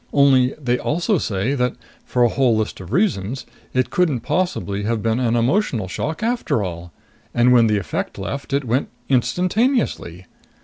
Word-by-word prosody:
Only 135 -2 +4
they 125 -3 0
also 175 +5 0
say 105 +4 -1
that 125 -2 0 0.3
for 125 - +1
a 120 - +5
whole 125 -2 +2
list 110 -1 -2
of 95 0 -9
reasons 130 - 0 0.3
it 130 0 0
couldn't 155 -10 +1
possibly 175 - -1
have 110 +1 -1
been 115 +1 +1
an 120 -2 +1
emotional 120 - +1
shock 155 - -4
after 230 - 0
all! 85 -1 -6 0.4
And 120 +1 +4
when 120 -2 +6
the 105 -1 +2
effect 95 -6 -4
left, 140 0 -5
it 140 0 0
went 125 +3 0 0.2
instantaneously. 180 - 0
125 Hz, 165 wpm, -21 LUFS, 110-150 Hz, 0.4 s, when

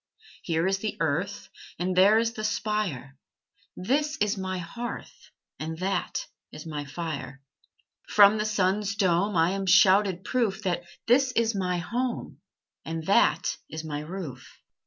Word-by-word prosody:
Here 165 0 0
is 195 +1 +1
the 215 0 -4
earth, 165 +6 -2 0.3
And 180 +1 -1
there 200 +4 +6
is 230 0 +1
the 215 - -6
spire; 195 - -2 0.6
This 295 +10 0
is 210 -6 +1
my 185 -1 -3
hearth, 235 +8 -7 0.3
And 160 +1 -4
that 195 - -2 0.3
is - - -10
my 150 -2 -5
fire. 140 -4 -6 0.7
From 205 +1 +6
the 210 - 0
sun's 200 0 0
dome 195 -1 +2
I 165 +2 +4
am 195 0 -3
shouted 190 0 +5
proof 215 -4 -1
That 175 -2 -1 0.2
this 260 +2 +4
is 230 -1 +2
my 180 -3 -1
home, 240 +7 -3 0.4
And 160 0 -5
that 195 - +3
is 160 0 -6
my 150 -2 -4
roof. 150 -5 -7
190 Hz, 145 wpm, -27 LUFS, 165-210 Hz, 0.7 s, there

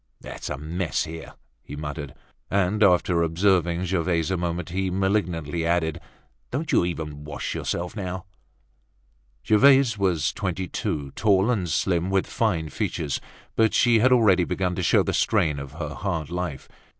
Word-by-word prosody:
"It's - - -7
a - - -3
mess 80 +4 -2
here!" 80 0 -8 0.3
he 70 - -9
muttered. 75 -1 -6 0.3
And 100 +2 +1
after 90 -3 +4
observing 85 +1 +2
Gervaise 85 -1 0
a - - +1
moment, 85 -1 -3
he 95 +2 -1
malignantly 90 -4 -1
added: 85 -1 0 0.5
"Don't 155 - -3
you - - +4
even 80 -4 -4
wash 75 - -5
yourself 90 +1 -3
now?" 95 -2 -5 1.2
Gervaise 130 0 +5
was 85 -7 +1
twenty 95 -1 -3
two, 70 -4 -3
tall 100 - +2
and 95 -7 -1
slim 85 +3 0
with 95 -1 +1
fine 85 -9 -1
features, 85 -9 -2 0.3
but 110 -1 +3
she 120 -2 +4
was 130 +4 +4
already 105 -7 +5
beginning 90 +1 -1
to - - -1
show - - +4
the - - -2
strain 75 -2 +1
of 70 0 -8
her 80 -1 -5
hard 85 -5 -3
life. 90 -6 -4
90 Hz, 155 wpm, -25 LUFS, 80-95 Hz, 1.2 s, Gervaise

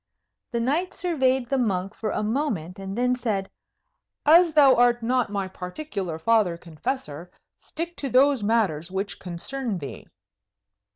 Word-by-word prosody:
The 235 - -1
knight 300 +10 0
surveyed 265 -8 +1
the 270 - +2
monk 195 -4 -1
for 220 - -4
a 210 - -1
moment, 210 - -2
and 195 +2 -6
then 250 +1 +2
said, 215 -6 -2 0.7
"As 335 +3 +7
thou 285 -3 +7
art 240 -1 +3
not 250 0 +1
my 200 -2 -2
particular 185 - -5
Father 200 -1 +2
Confessor, 170 - -5 0.3
stick 340 +1 -5
to 275 - -3
those 265 0 +4
matters 200 -7 +1
which 195 +2 -4
concern 205 +6 -4
thee." 140 -7 -8
230 Hz, 140 wpm, -25 LUFS, 185-265 Hz, 0.7 s, As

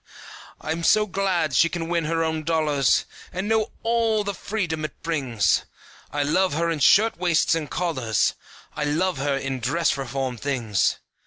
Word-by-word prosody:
I'm 160 +2 -3
so 210 +5 +4
glad 185 -6 0
she 170 +7 +4
can 170 -1 -4
win 170 -2 0
her 165 +1 0
own 160 -1 -2
dollars 150 -4 +2 0.3
And 185 +2 -3
know 220 0 +1
all 225 -2 +1
the 200 0 -3
freedom 175 -6 -3
it 155 - -6
brings. 130 - +1 0.5
I 145 0 -1
love 185 +5 +1
her 170 +2 0
in 160 - -2
shirt 220 +6 +4
waists 175 -3 +2
and 160 -3 -2
collars, 130 - 0 0.4
I 150 - -2
love 160 +3 0
her 140 0 0
in 135 -1 -3
dress 145 +6 +1
reform 135 -1 -3
things. 115 -6 0
160 Hz, 165 wpm, -24 LUFS, 140-185 Hz, 0.5 s, so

